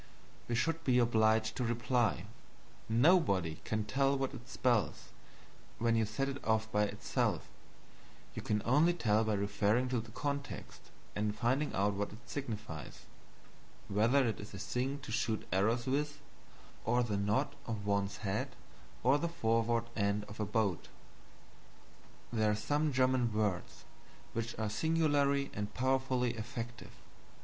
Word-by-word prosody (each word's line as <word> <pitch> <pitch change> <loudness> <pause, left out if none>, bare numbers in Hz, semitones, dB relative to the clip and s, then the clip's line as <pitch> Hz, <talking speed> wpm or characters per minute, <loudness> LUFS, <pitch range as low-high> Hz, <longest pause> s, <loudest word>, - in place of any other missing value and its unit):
we 120 - 0
should 165 +7 0
be 125 -4 +3
obliged 110 -2 +3
to 125 - -1
reply, 120 -4 +1 0.6
"Nobody 110 - +3
can 110 -1 -1
tell 135 +4 +2
what 135 0 -2
it 125 -1 -10
spells 120 -4 0 0.7
when 115 0 +2
you 110 -1 +2
set 125 +6 -1
if 140 0 -5
off 110 0 +1
by 105 0 +3
itself; - - -1 0.9
you - - -5
can 105 -1 -1
only 150 +8 +4
tell 110 -8 +2
by 110 -1 +1
referring 105 +5 +1
to 125 -1 +1
the 110 0 -8
context 140 +4 -5 0.3
and 105 0 0
finding 130 +6 +1
out 100 +1 +2
what 100 +1 -2
it 105 - -10
signifies 110 - -6 0.8
whether 115 +6 +3
it 110 - -2
is 105 0 -8
a - - -6
thing 125 +7 -2
to 115 - -8
shoot 110 -1 -1
arrows 110 +6 +2
with, 145 +3 -1 0.6
or 120 +2 +2
a 115 -4 -1
nod 105 +8 +1 0.2
of 110 -3 -3
one's 100 -1 0
head, 95 0 -2 0.5
or 135 +4 +5
the 170 - -1
forward 115 -6 +1
end 100 -1 +1
of 105 +1 -11
a 105 - 0
boat." 100 -4 0 1.5
There 110 -2 +3
are 105 - +2
some 145 +8 0
German 130 -2 +2
words 105 -4 -1 0.5
which 115 0 -3
are 110 0 -1
singularly 140 +2 +2
and 105 0 -3
powerfully 130 -1 +1
effective. 115 +1 -6
115 Hz, 145 wpm, -34 LUFS, 105-130 Hz, 1.5 s, or